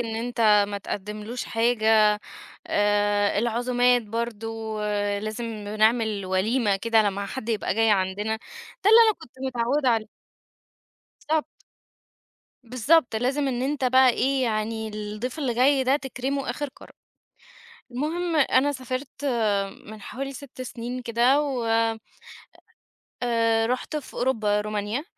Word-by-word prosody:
إن 225 Hz, -2 st, -3 dB
أنت 235 Hz, +1 st, -4 dB, 0.3 s
ما 205 Hz, 0 st, -4 dB
تقدّملوش 210 Hz, +5 st, -5 dB
حاجة. 220 Hz, -2 st, +3 dB, 0.5 s
آآ، 205 Hz, 0 st, +2 dB
العزومات 245 Hz, +1 st, +2 dB
برضه، 225 Hz, 0 st, -4 dB, 0.4 s
لازم 215 Hz, +3 st, -4 dB, 0.3 s
نعمل 220 Hz, -3 st, +2 dB
وليمة 205 Hz, +3 st, +1 dB
كده 225 Hz, +1 st, +3 dB
لمّا 200 Hz, -1 st, -2 dB
حد 235 Hz, +2 st, -6 dB
يبقى 215 Hz, -4 st, -1 dB
جاي 225 Hz, 0 st, +3 dB
عندنا، 205 Hz, +3 st, 0 dB, 0.5 s
ده 420 Hz, -, +6 dB
اللي 455 Hz, -, +9 dB
أنا 435 Hz, -, +4 dB
كنت 315 Hz, -6 st, -14 dB
متعودة 255 Hz, +2 st, 0 dB
عليه. 220 Hz, -2 st, +1 dB, 1.2 s
بالضبط. 315 Hz, -1 st, +2 dB, 1.2 s
بالضبط 250 Hz, +2 st, +2 dB
لازم 270 Hz, +4 st, 0 dB
إن 250 Hz, -1 st, -2 dB
أنت 275 Hz, 0 st, -1 dB
بقى 260 Hz, +1 st, +5 dB
إيه، 265 Hz, +2 st, 0 dB
يعني 220 Hz, -1 st, -2 dB
الضيف 215 Hz, +6 st, -5 dB
اللي 255 Hz, -5 st, -1 dB
جاي 265 Hz, +2 st, +3 dB
ده 265 Hz, +2 st, +3 dB
تكرمه 270 Hz, 0 st, -3 dB
آخر 290 Hz, -, -4 dB
كرم. -, -, -15 dB, 1.0 s
المهم 325 Hz, +6 st, -2 dB
أنا 285 Hz, -1 st, +3 dB
سافرت 260 Hz, +2 st, -6 dB, 0.6 s
من 215 Hz, 0 st, -10 dB
حوالي 275 Hz, +6 st, -6 dB
6 260 Hz, -1 st, -9 dB
سنين 245 Hz, 0 st, -6 dB
كده، 240 Hz, +5 st, +3 dB
و 265 Hz, -5 st, -2 dB, 1.6 s
آآ 230 Hz, -1 st, +2 dB
رُحت 250 Hz, +5 st, -2 dB
في 295 Hz, -, -6 dB
أوروبا، 215 Hz, -5 st, +1 dB
رومانيا، 210 Hz, +5 st, -3 dB
235 Hz, 125 wpm, -25 LUFS, 215-260 Hz, 1.6 s, اللي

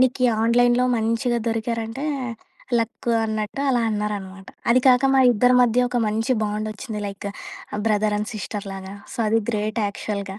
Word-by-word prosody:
నీకు 255 Hz, 0 st, +3 dB, 0.2 s
ఆన్‍లైన్‍లో 240 Hz, +2 st, +4 dB
మంచిగా 230 Hz, +2 st, 0 dB
దొరికారంటే, 225 Hz, +3 st, -3 dB, 0.7 s
లక్కు 230 Hz, +1 st, -2 dB
అన్నట్టు 215 Hz, +3 st, -3 dB
అలా 245 Hz, -3 st, +2 dB
అనరనమాట. 200 Hz, -2 st, -4 dB, 0.2 s
అది 250 Hz, +2 st, +5 dB
కాక 255 Hz, +1 st, +6 dB
మా 265 Hz, -, +5 dB
ఇద్దరి 245 Hz, +3 st, +4 dB
మధ్య 245 Hz, +1 st, +3 dB
ఒక 245 Hz, -, 0 dB
మంచి 220 Hz, +4 st, 0 dB
బాండొచ్చింది 215 Hz, +1 st, -4 dB
లైక్ 200 Hz, 0 st, -6 dB, 0.6 s
బ్రదర్ 210 Hz, -1 st, +2 dB
అండ్ 210 Hz, +1 st, -3 dB
సిస్టర్ 205 Hz, -1 st, -5 dB
లాగా. 195 Hz, 0 st, -8 dB, 0.2 s
సో, -, -, -8 dB
అది 225 Hz, +1 st, +3 dB
గ్రేట్ 215 Hz, 0 st, -1 dB
యాక్చువల్‌గా. 200 Hz, -1 st, -5 dB
220 Hz, 145 wpm, -23 LUFS, 210-240 Hz, 0.7 s, కాక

